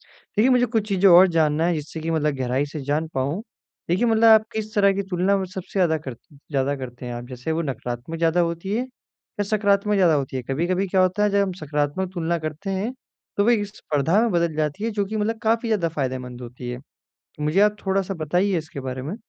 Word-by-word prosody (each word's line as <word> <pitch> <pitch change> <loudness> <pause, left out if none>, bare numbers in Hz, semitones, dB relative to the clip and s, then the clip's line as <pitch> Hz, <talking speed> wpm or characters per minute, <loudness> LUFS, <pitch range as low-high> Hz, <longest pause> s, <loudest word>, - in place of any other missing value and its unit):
देखिए 220 +5 0
मुझे 250 -1 +4
कुछ 220 -2 -1
चीज़ें 195 0 +4
और 180 +2 +8
जानना 155 +1 +2
है 175 - +2
जिससे 155 +1 -5
कि 165 +1 -2
मतलब 150 -2 +1
गहराई 130 +2 0
से 155 -3 -5
जान 150 +3 0
पाऊँ। 140 +8 -1 0.5
देखिए 185 +8 +2
मतलब 225 -1 +2
आप 220 -1 +7
किस 215 0 -4
तरह 200 -1 +5
की 200 - -1
तुलना 185 +2 +2
में 190 - -2
सबसे 185 0 -8
ज़्यादा 165 -3 +3
करते 145 +1 -10 0.2
ज़्यादा 140 0 +1
करते 125 -2 -8
हैं 120 - -5
आप 120 0 -6
जैसे 130 +4 -5
वो 160 +1 0
नकारात्मक 125 +1 -5
ज़्यादा 165 +1 +2
होती 170 +4 -2
है 240 - +1 0.6
या - - +2
सकारात्मक 205 0 +1
ज़्यादा 180 -5 +4
होती 135 -3 -1
है? - - -2
कभी-कभी 175 +9 -1
क्या 190 0 +2
होता 185 +3 +2
है 210 - +3
जब 200 0 +2
हम 195 -1 0
सकारात्मक 150 +4 -1
तुलना 170 -1 -1
करते 155 +5 -5
हैं 195 +5 -1 0.5
तो 200 - +4
वे 230 -3 +3
स्पर्धा 165 -2 0
में 235 -2 +1
बदल 170 -2 +1
जाती 155 +6 -2
है 230 - 0
जो 205 -2 -1
कि 215 +3 -4
मतलब 220 +2 -1
काफ़ी 225 +1 +1
ज़्यादा 195 -7 +1
फ़ायदेमंद 130 -4 -4
होती 125 0 -8
है। 125 0 -5 0.6
मुझे 150 +6 +1
आप 210 0 +4
थोड़ा-सा 195 0 0
बताइए 180 +4 0
इसके 155 -3 -6
बारे 130 -1 -5
में। 155 +10 -4
170 Hz, 225 wpm, -23 LUFS, 145-200 Hz, 0.6 s, और